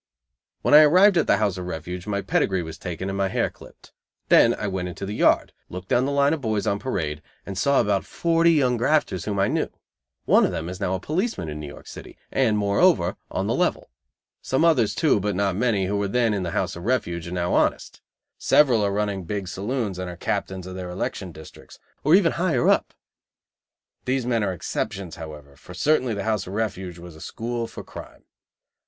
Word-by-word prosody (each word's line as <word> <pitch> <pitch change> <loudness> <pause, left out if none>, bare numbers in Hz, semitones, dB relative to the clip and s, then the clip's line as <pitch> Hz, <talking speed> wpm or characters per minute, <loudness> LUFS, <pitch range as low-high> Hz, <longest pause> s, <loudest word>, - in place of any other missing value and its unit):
When - - +2
I 150 - +11
arrived 185 +6 +6
at 165 - +2
the - - +4
House 100 -4 0
of 90 - -6
Refuge, 90 +3 -6
my 100 -1 -2
pedigree 95 -3 +1
was 80 -1 -8
taken 90 +1 -5
and 95 - -3
my 100 0 +1
hair 95 - -1
clipped. - - -17 0.4
Then - - +6
I - - -5
went 95 -2 -2
into 90 +2 -6
the 100 - -5
yard, - - +2 0.2
looked 90 +1 -8
down 125 +2 +3
the 140 - -1
line 140 +1 +3
of 160 - -3
boys 110 -4 -1
on 100 - 0
parade 80 - -3 0.2
and 100 - -6
saw 135 +9 +2
about 100 -1 +1
forty 165 0 +2
young 130 -6 +2
grafters 120 - +1
whom 105 -1 -2
I 100 0 +2
knew. - - -1 0.6
One - - +5
of - - +2
them 80 +1 -4
is 90 0 -7
now 95 - -1
a - - -3
policeman 170 - -2
in 75 0 -6
New 75 - -6
York 70 - -11
City, - - -11
and, 115 -6 +2
moreover, 100 - +3
on - - -2
the - - 0
level. - - -1 0.5
Some 135 +5 +1
others, 130 -11 +3
too, 155 -10 +3
but 100 0 -2
not 100 -1 0
many, 105 -3 +1
who 100 +2 -1
were 100 0 0
then 115 +1 +1
in 100 - -1
the 90 - -3
House - - -2
of 85 +2 -8
Refuge, 85 -9 -1
are - - -7
now 90 -1 -1
honest. - - 0 0.4
Several 125 -8 +4
are 100 - +1
running 100 -2 -2
big 100 +1 -4
saloons 100 0 -3
and 90 -1 -4
are 90 - -8
captains 95 +1 -3
of 95 - -7
their 90 -1 -6
election 90 +1 -4
districts, 80 -1 -13 0.3
or 155 +4 +6
even 185 -4 +4
higher 170 -8 +1
up. - - +2 1.1
These 130 -1 0
men 115 -3 +1
are 100 - 0
exceptions, 90 0 -4
however, 75 -3 -10
for 90 +5 -13
certainly 130 +2 +1
the 100 - -3
House 105 -4 -1
of 95 - -7
Refuge 95 -5 -3
was 85 -1 -11
a 80 - -14
school 115 0 -4
for - - -9
crime. - - -11
100 Hz, 215 wpm, -24 LUFS, 90-125 Hz, 1.1 s, I